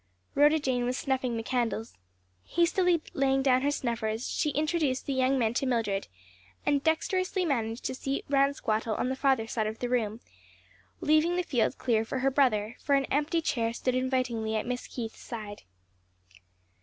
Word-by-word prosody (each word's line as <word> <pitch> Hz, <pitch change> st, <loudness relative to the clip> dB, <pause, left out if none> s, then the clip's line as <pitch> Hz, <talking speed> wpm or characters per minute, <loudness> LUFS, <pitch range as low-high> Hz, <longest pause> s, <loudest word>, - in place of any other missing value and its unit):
Rhoda 295 Hz, +2 st, +5 dB
Jane 260 Hz, -5 st, 0 dB
was 250 Hz, +1 st, -1 dB
snuffing 260 Hz, -3 st, -1 dB
the 225 Hz, -, -3 dB
candles. 230 Hz, -2 st, -1 dB, 0.5 s
Hastily 345 Hz, -, +2 dB
laying 270 Hz, 0 st, +2 dB
down 260 Hz, -1 st, +4 dB
her 285 Hz, -, +2 dB
snuffers, 230 Hz, -4 st, -2 dB
she 300 Hz, -, 0 dB
introduced 300 Hz, -2 st, 0 dB
the 280 Hz, -, -1 dB
young 260 Hz, +1 st, +2 dB
men 225 Hz, -3 st, +1 dB
to 265 Hz, +2 st, 0 dB
Mildred, 220 Hz, -6 st, 0 dB, 0.6 s
and 285 Hz, -1 st, +2 dB
dexterously 370 Hz, +3 st, +1 dB
managed 230 Hz, -6 st, -1 dB
to -, -, -1 dB
seat 270 Hz, +1 st, -3 dB
Ransquattle 275 Hz, -6 st, +1 dB
on 250 Hz, -, 0 dB
the 260 Hz, -, -1 dB
farther 265 Hz, -4 st, +2 dB
side 220 Hz, -1 st, -1 dB
of 220 Hz, +1 st, -4 dB
the 245 Hz, -, -3 dB
room, 225 Hz, -3 st, 0 dB, 0.8 s
leaving 310 Hz, +3 st, +3 dB
the 360 Hz, -, +1 dB
field 260 Hz, -8 st, 0 dB
clear 225 Hz, -3 st, +1 dB
for 225 Hz, -, -4 dB
her 270 Hz, +1 st, +1 dB
brother; 235 Hz, -5 st, +2 dB
for 280 Hz, -, +2 dB
an 275 Hz, 0 st, +2 dB
empty 300 Hz, +4 st, +1 dB
chair 230 Hz, -6 st, 0 dB
stood 255 Hz, +1 st, -1 dB
invitingly 255 Hz, -4 st, 0 dB
at 215 Hz, -, -1 dB
Miss 250 Hz, 0 st, -3 dB
Keith's 230 Hz, -3 st, -6 dB
side. 215 Hz, -3 st, -7 dB
260 Hz, 170 wpm, -29 LUFS, 230-285 Hz, 0.8 s, Rhoda